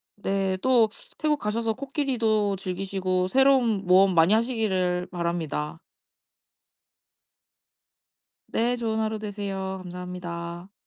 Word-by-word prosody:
네. 195 -2 -1
또 245 -4 +4 0.3
태국 300 -1 +1
가셔서 225 0 -1
코끼리도 235 -7 0
즐기시고 185 0 -1
새로운 250 -4 +3
모험 190 +1 +5
많이 165 +3 +5
하시기를 195 -7 0
바랍니다. 170 -3 -3 2.6
네. 240 +2 +1
좋은 225 -2 -1
하루 220 0 -1
되세요. 195 -2 -4
감사합니다. 180 0 -7
195 Hz, 235 characters per minute, -26 LUFS, 180-225 Hz, 2.6 s, 모험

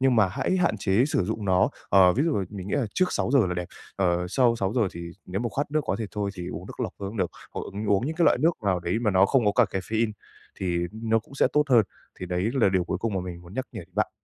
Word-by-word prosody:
nhưng 130 -2 +3
mà 105 -4 +5
hãy 185 - -1
hạn 170 -11 +2
chế 95 +5 +3
sử 95 - 0
dụng 110 +1 -3
nó. 95 -1 +3 0.2
Ờ, 90 -2 +6
ví 135 - +1
dụ 160 -9 +1
là 95 - -1
mình 100 -1 -7
nghĩ - - -1
là 135 -6 +1
trước 185 -1 +2
6:00 135 +2 +2
là 90 - -2
đẹp. 90 0 -2 0.3
Ờ, 90 -2 +1
sau 120 +3 +3
6:00 110 +4 0
thì 85 - -7 0.3
nếu 95 +2 -3
mà 120 - -1
khát 145 +1 -1
nước 155 - +2
quá - - +1
thì 115 - -2
thôi, 105 -1 -2
thì 90 -1 -6
uống - - -6
nước - - -9
lọc - - -2
thôi 100 -1 -4
cũng 110 - -8
được, 90 -4 0 0.2
hoặc, - - -3
ừm, 105 +1 -3
uống 100 +6 +2
những 160 - -3
cái 170 - +3
loại - - +4
nước 165 +4 +4
nào 95 -3 +1
đấy 85 +5 -1
mà 110 -3 +2
nó 95 +1 +5
không 125 0 +2
có 105 - +3
cà - - -3
caffeine 110 +2 -1 0.5
thì 90 -2 0
nó 115 +1 +1
cũng 125 +5 -13
sẽ - - +3
tốt 150 0 +3
hơn. 115 -3 +7 0.4
Thì 95 - -4
đấy 90 +4 -1
là 125 -7 +4
điều 95 -2 +1
cuối - - -2
cùng 115 -3 -2
mà 95 - 0
mình 90 -1 -7
muốn 90 +2 -13
nhắc 130 +2 -3
nhở 110 - -6
đến 90 +1 -16
bạn. - - +1
105 Hz, 300 wpm, -26 LUFS, 95-120 Hz, 0.5 s, hơn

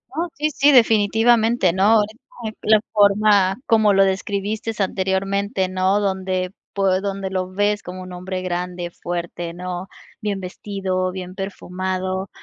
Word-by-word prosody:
No, 335 +2 -1
sí 300 +2 0
sí, 290 +1 +4
definitivamente, 225 -3 +4
¿no? 210 +4 +4 0.6
La 215 0 +5
forma 205 -2 +4
como 220 -3 +4
lo 195 0 +5
describiste 200 +3 -2
anteriormente, 195 +1 0
¿no? 185 +2 +1
Donde, 190 -2 -1 0.2
pues, 190 -1 +1
donde 195 -1 -3
lo 185 -1 -3
ves 205 +2 +1
como 185 +1 -7
un 185 - -9
hombre 185 +1 -4
grande, 180 -1 -3
fuerte, 170 -1 -5
¿no? 180 +1 -5 0.3
Bien 205 -2 -2
vestido, 185 0 -3
bien 185 -1 -7
perfumado. 185 -1 -3
190 Hz, 130 wpm, -21 LUFS, 185-205 Hz, 0.6 s, La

